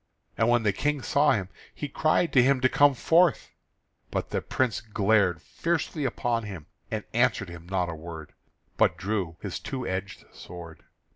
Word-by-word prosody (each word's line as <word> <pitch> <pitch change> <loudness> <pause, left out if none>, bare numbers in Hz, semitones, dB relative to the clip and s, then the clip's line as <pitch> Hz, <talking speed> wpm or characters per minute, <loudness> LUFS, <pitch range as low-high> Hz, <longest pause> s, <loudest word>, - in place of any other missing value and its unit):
And 115 - +2
when 120 -1 +3
the 105 -2 +2
King 145 +4 -1
saw 145 +1 +3
him, 95 -4 -2 0.3
he 145 - -4
cried 155 +4 +1
to 130 - +7
him 135 +1 +3
to 130 - +5
come 145 0 +5
forth; 170 +5 +3 0.6
but - - -3
the - - -1
Prince 130 -3 -1
glared 100 -5 +2
fiercely 165 -3 -2
upon 120 -2 0
him 95 -8 -8 0.2
and 110 -1 -3
answered 120 -4 +2
him 85 0 -10
not 95 -2 0
a 85 - -4
word, 80 -1 -9 0.4
but 85 - +3
drew 95 -3 -2
his - - -4
two 130 -2 -5
edged 95 +2 -4
sword. 85 -2 -11
110 Hz, 170 wpm, -27 LUFS, 90-135 Hz, 0.6 s, to